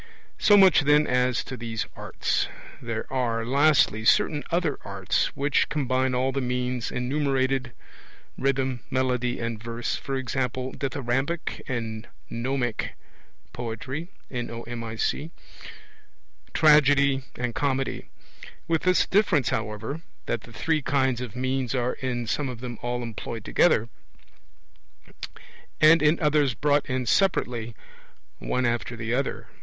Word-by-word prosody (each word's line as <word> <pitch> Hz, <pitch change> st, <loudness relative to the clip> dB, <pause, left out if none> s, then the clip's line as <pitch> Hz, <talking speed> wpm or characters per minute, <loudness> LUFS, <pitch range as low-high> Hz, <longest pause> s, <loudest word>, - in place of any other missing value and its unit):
So 205 Hz, -, +6 dB
much, 190 Hz, -3 st, +7 dB
then, 150 Hz, +1 st, +4 dB
as 125 Hz, 0 st, +1 dB
to 130 Hz, -, -6 dB
these 115 Hz, -2 st, -4 dB
arts. -, -, -1 dB, 0.3 s
There 115 Hz, -1 st, -3 dB
are, 115 Hz, -3 st, 0 dB
lastly, 135 Hz, -4 st, +3 dB
certain 145 Hz, +6 st, +3 dB
other 170 Hz, -4 st, 0 dB
arts, 100 Hz, -1 st, 0 dB
which 140 Hz, +1 st, +1 dB
combine 130 Hz, -3 st, 0 dB
all 130 Hz, +1 st, +1 dB
the 135 Hz, +1 st, -1 dB
means 125 Hz, -1 st, -2 dB
enumerated, 130 Hz, -1 st, 0 dB, 0.6 s
rhythm, 130 Hz, -1 st, 0 dB
melody, 125 Hz, -2 st, 0 dB
and 115 Hz, -2 st, -3 dB
verse, 115 Hz, 0 st, -3 dB
e.g. 135 Hz, -1 st, -2 dB, 0.5 s
Dithyrambic 135 Hz, +4 st, -2 dB
and 115 Hz, -4 st, -4 dB, 0.2 s
Nomic 120 Hz, -1 st, -2 dB, 0.6 s
poetry, 130 Hz, +8 st, -5 dB, 2.4 s
Tragedy 145 Hz, -3 st, +5 dB
and 120 Hz, -1 st, -2 dB
Comedy; 135 Hz, 0 st, -1 dB, 0.6 s
with 165 Hz, -2 st, +1 dB
this 185 Hz, 0 st, +3 dB
difference, 185 Hz, -, +3 dB
however, 110 Hz, +7 st, -3 dB, 0.2 s
that 120 Hz, -, -2 dB
the 120 Hz, -, -14 dB
three 155 Hz, +7 st, 0 dB
kinds 130 Hz, -3 st, +1 dB
of 120 Hz, -5 st, -6 dB
means 130 Hz, 0 st, -1 dB
are 125 Hz, 0 st, 0 dB
in 125 Hz, -3 st, -3 dB
some 135 Hz, +4 st, -1 dB
of 125 Hz, -2 st, -7 dB
them 120 Hz, -2 st, -6 dB
all 120 Hz, 0 st, -2 dB
employed 115 Hz, -1 st, -6 dB
together, 120 Hz, -10 st, +3 dB, 1.9 s
and 155 Hz, +1 st, +7 dB
in 150 Hz, +2 st, +4 dB
others 150 Hz, -5 st, +2 dB
brought 145 Hz, +5 st, +2 dB
in 130 Hz, 0 st, -1 dB
separately, 120 Hz, -, +1 dB, 0.6 s
one 125 Hz, 0 st, -1 dB
after 120 Hz, 0 st, -1 dB
the 115 Hz, 0 st, -3 dB
other. 135 Hz, +2 st, -1 dB
130 Hz, 120 wpm, -26 LUFS, 120-145 Hz, 2.4 s, much